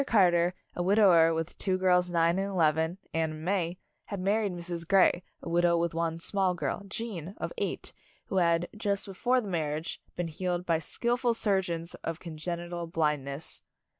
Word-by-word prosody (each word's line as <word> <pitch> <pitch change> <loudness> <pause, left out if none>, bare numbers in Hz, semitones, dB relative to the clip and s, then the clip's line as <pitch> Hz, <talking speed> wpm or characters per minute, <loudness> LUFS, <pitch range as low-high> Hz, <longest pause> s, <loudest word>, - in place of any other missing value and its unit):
Car 190 -5 +5
ter, 175 +1 +2 0.2
a - - -2
widower 180 -4 +5
with 165 +1 -2
two 190 -2 +1
girls 180 -1 +3
nine 170 +1 +2
and 195 - 0
eleven, 160 -1 +2 0.2
Anne 160 -1 0
and 155 +1 -8
May, 180 -2 0 0.3
had 200 - -5
married 200 +2 +1
Mrs. 170 -1 -4
Grey, 185 -1 +5 0.2
a - - -7
widow 170 0 +3
with 170 0 0
one 165 0 -1
small 190 +1 +1
girl, 175 - -2
Gene, 195 -4 -5
of - - -4
eight, - - -3 0.3
who 190 - -2
had, 170 -1 +3
just 200 -2 0
before 245 +6 +1
the 215 - -7
mar 155 -5 -1
riage, 160 - -5 0.2
been 175 -1 -2
healed 175 +2 -2
by 165 -2 +2
skillful 240 - 0
surgeons 180 -6 0
of 165 0 -3
congenital 170 +1 -5
blindness. 150 -3 -1
175 Hz, 175 wpm, -29 LUFS, 165-190 Hz, 0.3 s, Car